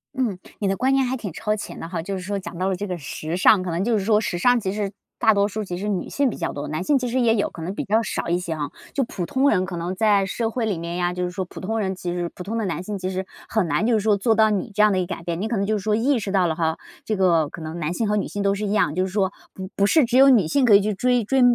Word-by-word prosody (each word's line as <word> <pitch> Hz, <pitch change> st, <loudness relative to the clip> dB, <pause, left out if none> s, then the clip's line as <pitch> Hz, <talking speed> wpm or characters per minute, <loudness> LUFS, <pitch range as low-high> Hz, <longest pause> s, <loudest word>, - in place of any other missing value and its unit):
嗯， 235 Hz, -8 st, -1 dB, 0.2 s
你 205 Hz, -, 0 dB
的 195 Hz, -, +1 dB
观 260 Hz, +5 st, +2 dB
念 270 Hz, -1 st, +3 dB
还 255 Hz, +1 st, -1 dB
挺 210 Hz, -6 st, -6 dB
超 210 Hz, +2 st, -1 dB
前 210 Hz, -, -7 dB
的 165 Hz, -, -6 dB
哈， 170 Hz, -2 st, -3 dB
就 195 Hz, +4 st, -4 dB
是 185 Hz, -, -5 dB
说 200 Hz, +2 st, -3 dB
讲 180 Hz, -2 st, -8 dB
到 185 Hz, +2 st, 0 dB
了 190 Hz, -, 0 dB
这 205 Hz, +3 st, -4 dB
个 180 Hz, -1 st, -3 dB
时 155 Hz, +3 st, -5 dB
尚。 185 Hz, +1 st, +5 dB
可 180 Hz, -2 st, -3 dB
能 170 Hz, +3 st, -1 dB
就 225 Hz, -1 st, +2 dB
是 190 Hz, -, -4 dB
说 210 Hz, -1 st, +4 dB
时 175 Hz, -4 st, -2 dB
尚 245 Hz, +6 st, +4 dB
其 190 Hz, -3 st, -2 dB
实 205 Hz, -1 st, -2 dB, 0.3 s
大 220 Hz, -, +5 dB
多 200 Hz, 0 st, +2 dB
数 215 Hz, +1 st, -4 dB
其 180 Hz, -3 st, -5 dB
实 205 Hz, +3 st, -4 dB
女 190 Hz, -4 st, -2 dB
性 280 Hz, -2 st, +1 dB
比 -, -, -6 dB
较 -, -, -3 dB
多， 145 Hz, -, -5 dB
男 155 Hz, +4 st, -3 dB
性 285 Hz, +4 st, +3 dB
其 250 Hz, -, -2 dB
实 250 Hz, +2 st, 0 dB
也 230 Hz, -2 st, +4 dB
有， 205 Hz, -, 0 dB
可 165 Hz, -, -10 dB
能 185 Hz, +4 st, -3 dB
比 -, -, -2 dB
较 220 Hz, +3 st, +2 dB
少 -, -, -3 dB
一 175 Hz, -, +2 dB
些 175 Hz, -2 st, -4 dB
啊。 150 Hz, -3 st, -3 dB, 0.2 s
就 275 Hz, -, +1 dB
普 190 Hz, -7 st, -4 dB
通 270 Hz, +8 st, +2 dB
人 185 Hz, -, +2 dB
可 185 Hz, -, -6 dB
能 175 Hz, +2 st, -3 dB
在 205 Hz, -2 st, +3 dB
社 225 Hz, +4 st, -1 dB
会 235 Hz, +1 st, -2 dB
里 205 Hz, -5 st, -1 dB
面 170 Hz, +1 st, -5 dB
呀， 175 Hz, 0 st, 0 dB
就 180 Hz, 0 st, -3 dB
是 180 Hz, -, -2 dB
说 190 Hz, +1 st, -3 dB
普 -, -, -11 dB
通 225 Hz, +4 st, -2 dB
人 190 Hz, -2 st, -1 dB
其 175 Hz, -1 st, -4 dB
实 175 Hz, -1 st, -2 dB
普 180 Hz, -, -7 dB
通 210 Hz, +5 st, -4 dB
的 225 Hz, -, -1 dB
男 175 Hz, -2 st, -2 dB
性 205 Hz, +1 st, -4 dB
其 185 Hz, 0 st, -3 dB
实 190 Hz, 0 st, -3 dB, 0.2 s
很 215 Hz, -6 st, +1 dB
难 210 Hz, -, +1 dB
就 245 Hz, -, +3 dB
是 220 Hz, -, +3 dB
说 210 Hz, 0 st, +3 dB
做 220 Hz, +3 st, +2 dB
到 220 Hz, -1 st, +5 dB
你 205 Hz, +2 st, -2 dB
这 210 Hz, -, +3 dB
样 215 Hz, -, +5 dB
的 185 Hz, -, +1 dB
一 180 Hz, -, 0 dB
个 -, -, -3 dB
改 165 Hz, -, -12 dB
变， 170 Hz, 0 st, -3 dB
你 215 Hz, -, -1 dB
可 230 Hz, -, -1 dB
能 195 Hz, -, 0 dB
就 215 Hz, +2 st, 0 dB
是 200 Hz, -, -6 dB
说 215 Hz, -1 st, +2 dB
意 250 Hz, +3 st, +2 dB
识 195 Hz, -2 st, -4 dB
到 190 Hz, -2 st, +3 dB
了 160 Hz, -, -1 dB
哈。 160 Hz, 0 st, 0 dB, 0.3 s
这 215 Hz, -, -1 dB
个 170 Hz, -6 st, +3 dB
可 -, -, -9 dB
能 160 Hz, +2 st, -6 dB
男 155 Hz, 0 st, -2 dB
性 220 Hz, +4 st, -1 dB
和 210 Hz, -, +1 dB
女 205 Hz, -, 0 dB
性 205 Hz, -, -4 dB
都 200 Hz, 0 st, +2 dB
是 205 Hz, +1 st, -3 dB
一 200 Hz, -, -2 dB
样， 150 Hz, -7 st, +2 dB
就 185 Hz, -, +1 dB
是 185 Hz, -, -8 dB
说 195 Hz, -2 st, +1 dB, 0.2 s
不 190 Hz, -1 st, -7 dB
不 200 Hz, -, +3 dB
是 310 Hz, +1 st, +4 dB
只 245 Hz, +2 st, +1 dB
有 275 Hz, +1 st, +8 dB
女 215 Hz, -11 st, +5 dB
性 275 Hz, -, +2 dB
可 215 Hz, -4 st, +7 dB
以 200 Hz, -, +6 dB
去 210 Hz, +1 st, -1 dB
追 245 Hz, +3 st, +1 dB
追 265 Hz, +5 st, +1 dB
200 Hz, 375 characters per minute, -23 LUFS, 180-220 Hz, 0.3 s, 有